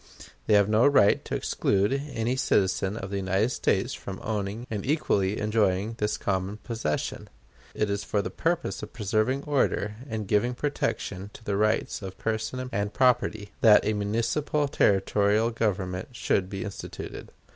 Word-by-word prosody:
They 105 - +5
have 100 -1 +5
no 110 +5 +4
right 105 -8 +4
to - - -3
exclude 100 +4 +1
any 130 -4 -2
citizen 100 -5 +1
of 95 -1 -6
the 100 - -1
United 95 +4 +1
States - - 0
from 95 -1 -7
owning 105 +2 -3
and 105 -4 -4
equally 105 -9 +1
enjoying 105 -1 +1
this 105 0 0
common 95 +1 -2
possession; 110 -9 -3 0.5
it 105 - +1
is 100 0 -2
for 100 +1 -1
the - - -4
purpose 170 +1 -1
of - - -8
preserving 110 +4 0
order, 120 -7 0
and 110 -3 -3
giving 115 +5 +1
protection 105 -8 -2
to 105 -3 -4
rights 110 +1 +1
of 95 -1 -7
person 110 +3 -2
and 100 0 -2
property, 110 -5 +2
that 105 -3 +7
a 110 - +1
municipal 115 +8 0
territorial 105 0 +2
government 95 -5 -1
should 95 -5 0
be 95 -1 -4
instituted. 100 - -7
105 Hz, 155 wpm, -27 LUFS, 100-115 Hz, 0.5 s, that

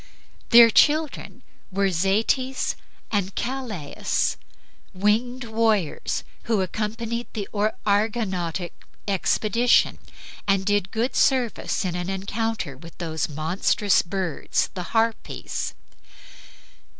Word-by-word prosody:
Their 230 -1 +9
children 305 +5 +2 0.3
were 195 0 +1
Zetes 220 +9 +1 0.4
and 200 -3 -1
Calais, 235 - -2 0.6
winged 230 +6 +1
warriors, 220 -6 0 0.2
who 220 -4 +1
accompanied 225 +4 -3
the 205 -3 -4 0.4
Argonautic 200 -5 0 0.4
expedition, 215 +4 +2 0.5
and 195 -1 +2
did 205 -2 +1
good 230 +4 -1
service 250 -6 +1
in 180 - -1
an 180 +1 -3
encounter 200 - -2
with 165 +5 -13
those 160 -3 -2
monstrous 165 +6 +2
birds 185 -3 -2
the 180 +3 -7
Harpies. 225 0 -1
205 Hz, 90 wpm, -24 LUFS, 185-230 Hz, 0.6 s, Their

